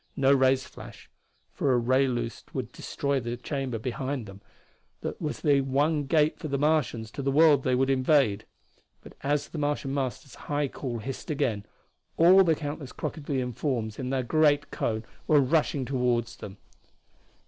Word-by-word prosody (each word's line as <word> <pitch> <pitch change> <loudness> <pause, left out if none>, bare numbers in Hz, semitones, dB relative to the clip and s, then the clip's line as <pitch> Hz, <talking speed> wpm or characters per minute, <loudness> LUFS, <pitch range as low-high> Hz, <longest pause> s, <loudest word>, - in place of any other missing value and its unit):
No 135 0 +4
rays 130 -1 +3
flashed, - - -12 0.4
for 135 - +1
a - - +3
ray 130 +3 +2
loosed 120 -2 -4
would - - -3
destroy 140 -1 -2
the 120 0 -4
chamber 135 -2 -3
behind 130 +2 -3
them 100 0 -12 0.6
that - - -5
was 150 - -3
the 145 -3 +4
one 145 +3 +1
gate 150 +2 +2
for - - -5
the 140 -1 -1
Martians 140 -7 0
to 140 - -5
the 135 - 0
world 150 -1 +5
they 130 -1 +1
would 135 +1 +2
invade. 130 -5 +2 0.6
But - - -12
as 145 +1 -1
the 160 - -6
Martian 145 -2 -1
Master's 135 -1 -3 0.2
high 145 -1 0
call 125 -3 -5
hissed 130 +4 -6
again 110 -8 -1 0.5
all 185 +4 +7
the 165 -3 +3
countless 145 -3 -6
crocodilian 135 -5 -3
forms 120 -4 -2
in 130 -1 -3
the 130 -1 0
great 145 +2 +2
cone 110 0 -2 0.2
were 150 -2 +5
rushing 140 -1 +1
toward 125 -3 +1
them. 105 -4 -10
135 Hz, 170 wpm, -27 LUFS, 125-145 Hz, 0.6 s, all